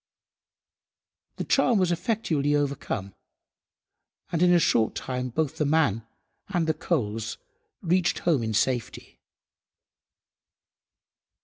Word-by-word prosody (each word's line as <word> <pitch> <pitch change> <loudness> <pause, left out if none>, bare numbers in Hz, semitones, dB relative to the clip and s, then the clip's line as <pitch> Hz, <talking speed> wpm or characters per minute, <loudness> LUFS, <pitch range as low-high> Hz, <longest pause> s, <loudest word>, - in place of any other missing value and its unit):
The - - -4
charm 255 -4 +3
was 185 -2 +2
effectually 170 -6 0
overcome, 135 -9 -2 1.2
and 165 - -1
in 180 0 +5
a 175 - +6
short 115 -9 +2
time 125 -1 -3
both 150 +3 -2
the - - +1
man 130 -8 +1 0.4
and 175 -5 0
the 160 - +1
coals 115 -9 -2 0.5
reached 180 0 +2
home 160 -7 +1
in 110 -1 -2
safety. 120 0 -2
150 Hz, 105 wpm, -26 LUFS, 120-175 Hz, 1.2 s, a